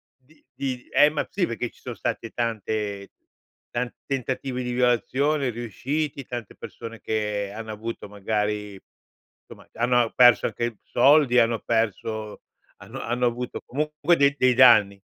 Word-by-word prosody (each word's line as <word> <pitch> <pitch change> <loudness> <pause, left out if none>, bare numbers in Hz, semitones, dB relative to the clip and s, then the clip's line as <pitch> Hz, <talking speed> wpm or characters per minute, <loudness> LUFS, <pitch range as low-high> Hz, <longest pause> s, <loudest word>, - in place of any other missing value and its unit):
di 135 +5 -27
di 130 -3 -4
ehm, 150 +1 +5
ma - - -1
sì 195 -3 0
perché 115 -2 -4
ci - - -24
sono 125 -3 -6
stati 115 0 -4
tante 110 -3 -3 0.6
tanti 120 0 -3
tentativi 130 -1 -3
di 125 - -3
violazione 130 +3 +1
riusciti, 135 +6 -3
tante 120 -4 -7
persone 115 -1 -9
che 105 -2 -2
hanno 110 0 -7
avuto 110 0 -6
magari 105 0 -3 0.7
insomma, - - -14
hanno 120 0 +2
perso 120 -2 +6
anche 115 0 -3
soldi, 135 0 +4
hanno 115 0 +2
perso 110 -1 -2 0.4
hanno - - -8
hanno 120 +1 -1
avuto 120 +1 -4
co - - -28
comunque 150 +4 +1
dei 140 0 +3
dei 125 0 +4
danni. 110 -6 +6
120 Hz, 145 wpm, -24 LUFS, 110-130 Hz, 0.7 s, perso